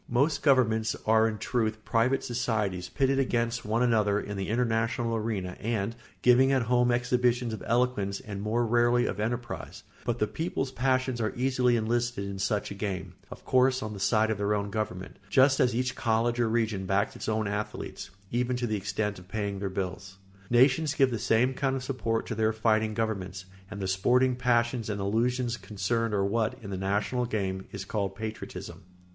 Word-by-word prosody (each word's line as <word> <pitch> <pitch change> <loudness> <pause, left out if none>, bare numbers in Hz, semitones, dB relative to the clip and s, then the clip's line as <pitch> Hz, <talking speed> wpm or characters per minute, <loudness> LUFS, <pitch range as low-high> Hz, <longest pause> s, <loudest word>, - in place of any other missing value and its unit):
Most 140 +6 +2
governments 115 -6 +3
are 110 0 +4
in 110 -1 -3
truth 110 -2 -1
private 125 +3 +2
societies 105 -7 -1
pitted 135 -1 +1
against 115 -2 0
one 110 +3 +1
another 105 -4 +2
in 105 0 -5
the 95 0 -3
international 115 0 0
arena 105 -5 -2
and 115 0 -2 0.3
giving 125 +2 +6
meantime 135 -2 +2
at - - -7
home 125 0 +4
exhibitions 125 -1 +1
of 110 - -6
eloquence 115 -5 +1
and 100 -5 -7
more 115 +3 0
rarely 120 +1 +3
of - - -3
enterprise; 120 +2 -4 0.2
but 120 -1 -1
the 105 - +2
people's 140 0 -3
passions 130 -2 0
are 110 - -1
easily 125 -1 +2
enlisted 120 -1 0
in 100 -1 -6
such 100 +1 -1
a - - -3
game, 95 -2 -4 0.2
of - - -11
course 130 0 +3
on 110 0 -4
the 100 - -7
side 110 +2 +2
of 105 - -2
their 105 +1 +1
own 100 0 -2
government, 100 -3 -4
just 130 +6 +5
as 125 -2 +3
each 125 +1 0
college 115 +1 +1
or 120 -2 +2
region 110 -4 0
backs 100 +2 +1
its - - -4
own 110 -1 0
athletes, 105 +1 -4 0.2
even 125 +1 0
to 125 0 -1
the 110 -2 -1
extent 100 +1 -2
of 90 - -15
paying 100 -1 -3
their 100 0 -2
bills. 95 +1 -5 0.3
Nations 140 +5 +4
give 135 -3 +4
the 115 - -2
same 120 +3 +2
kind 135 0 0
of 130 - -4
support 120 -4 -1
to - - -4
their 110 0 +1
fighting 110 0 +1
governments, 95 -4 -3 0.2
and 105 - -7
the 95 - -2
sporting 125 +7 +3
passions 120 -2 +1
and 100 -1 -2
illusions 120 +4 0
concerned 105 +3 -1
are 100 -1 +1
what, 110 +4 0
in 100 - -7
the - - -2
national 100 +6 -1
game, 95 -4 -2
is 100 0 -6
called 100 -2 -2
patriotism. 110 +1 -7
115 Hz, 190 wpm, -28 LUFS, 105-125 Hz, 0.3 s, giving